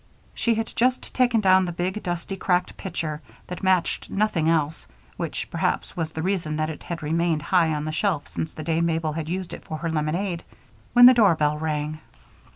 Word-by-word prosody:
She 230 -1 +1
had 225 +1 -3
just 255 +2 +1
taken 245 -3 +3
down 190 -1 +5
the 175 - -3
big, 185 +4 -2
dusty, 175 +2 -3
cracked 180 -1 0
pitcher 155 -5 -4 0.2
that 180 - -7
matched 185 -2 +1
nothing 195 -6 +1
else 160 -1 0 0.3
which - - -4
perhaps - - -1
was 165 -3 -2
the 160 0 -4
reason 175 -5 -1
that 155 +1 -1
it 150 - -9
had 170 -2 -6
remained 165 0 0
high 170 -2 +3
on 150 0 -3
the 155 - -2
shelf 165 -2 -1
since 160 - -4
the 155 - -8
day 165 +1 0
Mabel 165 -2 0
had 160 0 -4
used 185 0 -3
it - - -8
for 155 - -5
her 165 +2 -3
lemonade 170 +3 -1 0.5
when 245 0 +9
the 255 - +10
doorbell 155 -10 +3
rang. 155 -1 -2
170 Hz, 195 wpm, -24 LUFS, 155-190 Hz, 0.5 s, the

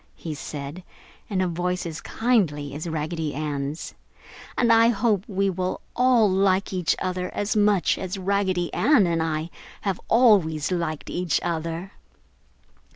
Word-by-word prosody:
he 160 - -6
said, 145 +3 -7 0.5
in 190 -3 0
a 185 - +1
voice 180 +1 -2
as 165 -1 -5
kindly 180 - 0
as 155 +4 -5
Raggedy 160 -1 -3
Ann's, 145 0 -4 0.6
"and 235 -2 +4
I 230 0 +6
hope 215 -3 +2
we 195 -1 0
will 185 -1 -2 0.2
all 250 -3 +4
like 190 0 +2
each 180 -3 +1
other 180 -1 -2
as 205 +1 -1
much 205 -3 +3
as 185 +1 -4
Raggedy 190 -2 0
Ann 280 -10 +4
and 165 -1 0
I 160 +1 -2 0.3
have 195 -3 -2
always 190 - +4
liked 170 -4 -2
each 175 -3 0
other!" 170 +2 -3
180 Hz, 145 wpm, -24 LUFS, 160-200 Hz, 0.6 s, I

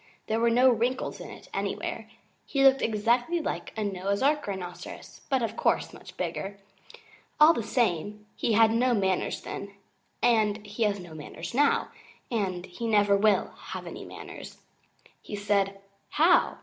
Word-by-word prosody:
There 220 +1 0
were 235 0 +3
no 250 +3 +5
wrinkles 245 +3 -1
in - - -8
it - - -12
anywhere. - - -3 0.4
He 275 -1 +1
looked 270 0 +6
exactly 240 +9 +1
like 315 - -4
a 215 - -1
Noah's 200 +2 -1
Ark 295 -1 +2
Rhinoceros, 180 -3 -7
but 265 -3 +2
of 225 - -2
course - - +1
much - - -13
bigger. 200 +1 -4 0.8
All 305 +2 +8
the 235 - -2
same, 210 -2 -1
he 230 - 0
had 225 +1 +6
no 245 +2 +3
manners 190 -3 0
then, 200 0 -7 0.5
and 215 -3 +2
he 210 +3 -8
has 205 -1 0
no 175 -3 -10
manners 155 +4 -8
now, 285 +3 +3 0.4
and 190 -6 -1
he 230 +6 -5
never 205 -2 +4
will 200 -1 +3
have - - -8
any - - -7
manners. - - -10 0.6
He - - -7
said, 200 -1 0 0.3
'How! 325 +4 +4
215 Hz, 160 wpm, -28 LUFS, 200-240 Hz, 0.8 s, All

